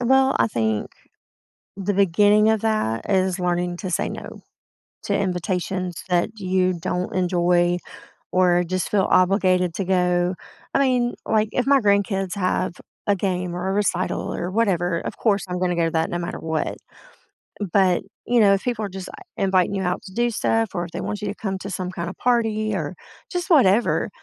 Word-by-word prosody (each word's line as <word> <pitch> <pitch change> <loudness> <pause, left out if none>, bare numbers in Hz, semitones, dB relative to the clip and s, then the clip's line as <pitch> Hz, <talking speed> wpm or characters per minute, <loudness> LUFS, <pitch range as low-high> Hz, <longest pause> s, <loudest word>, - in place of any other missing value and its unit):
Well, 265 +2 +3
I 115 - +4
think 110 -2 -1 0.9
the 200 +1 -1
beginning 205 +3 +4
of 220 -2 +2
that 215 - -1
is 190 -1 +1
learning 175 0 -1
to 185 0 -5
say 175 - 0
no, - - -8 0.6
to - - -1
invitations 185 -1 -2
that 175 +1 +1
you 185 -2 +1
don't 180 +2 -3
enjoy 175 -1 +2 0.5
or 180 -1 +4
just 185 +1 -2
feel 200 -2 +2
obligated 185 -2 +3
to 195 - -2
go, 180 -1 +2 0.4
I - - +4
mean, 250 -3 +2
like, 215 -1 +2
if 250 - 0
my 275 0 +5
grandkids 200 -2 +1
have 185 -2 0 0.3
a 205 - +3
game 180 -2 -2
or 190 +2 -2
a - - 0
recital 195 -2 -1
or 175 - -3
whatever, 180 -5 +1
of - - -6
course 205 -4 +1
I'm 180 0 -3
gonna 180 -1 0
go 170 -1 +2
to - - 0
that 160 0 0
no 175 - -2
matter 175 0 -4
what. 160 -1 -2 1.0
But, 185 -3 +3 0.2
you 240 0 +2
know, 200 -3 +6
if 195 - 0
people 235 -4 -1
are - - -5
just 190 0 -7
like, 395 - -12
inviting 190 -1 +2
you 190 - -1
out 180 0 -1
to 190 - -11
do 240 +3 +1
stuff 225 0 +1
or 175 -2 -2
if 170 - -11
they - - -5
want 210 - -4
you 210 - -3
to 200 - -3
come 195 -3 -3
to 195 - -6
some 185 -1 -4
kind 170 -2 -4
of 190 - -10
party 220 -3 +1
or 160 -1 -3 0.4
just 355 -1 -3
whatever, 240 - +4
190 Hz, 190 wpm, -23 LUFS, 180-210 Hz, 1.0 s, know